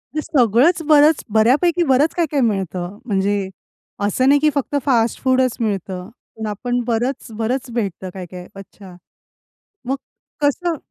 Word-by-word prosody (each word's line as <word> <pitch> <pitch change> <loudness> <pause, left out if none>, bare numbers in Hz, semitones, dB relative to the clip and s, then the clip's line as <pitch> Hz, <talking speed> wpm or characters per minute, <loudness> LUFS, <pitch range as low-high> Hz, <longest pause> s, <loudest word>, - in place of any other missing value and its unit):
ते 310 - 0
सगळंच 265 - +3
बरंच, 300 0 +5
बर्‍यापैकी 270 - +3
बरंच 275 +4 +3
काय-काय 310 -5 0
मिळतं, 190 -4 -2
म्हणजे 200 -2 0 0.6
असं 255 +6 +1
नाही 285 +1 +5
की 305 +1 +3
फक्त 280 +1 -2
फास्ट 235 -5 +2
फूडच 260 -1 +2
मिळतं. 195 -4 -3 0.3
पण 220 - -5
आपण 245 +4 -2
बरंच, 240 +2 -2
बरंच 250 +3 -2
भेटतं, 195 -5 -3
काय-काय. 180 -1 -9
अच्छा. 195 -1 -12 0.9
मग 270 - 0 0.5
कसं 330 +4 +1
240 Hz, 130 wpm, -19 LUFS, 200-280 Hz, 0.9 s, बरंच